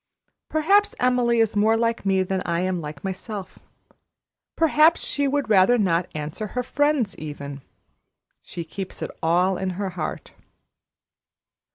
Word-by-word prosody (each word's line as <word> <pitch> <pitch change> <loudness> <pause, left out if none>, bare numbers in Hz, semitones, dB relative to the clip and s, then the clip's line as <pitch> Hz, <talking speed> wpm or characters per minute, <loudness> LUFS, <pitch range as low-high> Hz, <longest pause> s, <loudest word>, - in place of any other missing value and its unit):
Perhaps 395 +7 +3
Emily 245 -2 +2
is 220 -1 +1
more 220 +2 +3
like 230 -3 -1
me 190 -1 +3
than 190 0 -2
I 170 0 -1
am 185 -1 -1
like 150 -2 -8
myself. 195 +1 -6 1.0
Perhaps 320 0 +4
she 285 -1 -1
would 285 -1 0
rather 215 +3 +5
not 180 -5 +1
answer 155 +8 -4
her 250 - +1
friends, 280 -4 +1
even. 145 -2 -7 0.8
She 170 - -7
keeps 190 +3 -7
it - - -4
all 180 +3 +2
in 190 -1 -2
her 195 -2 -2
heart." 165 -4 -5
195 Hz, 140 wpm, -24 LUFS, 175-245 Hz, 1.0 s, rather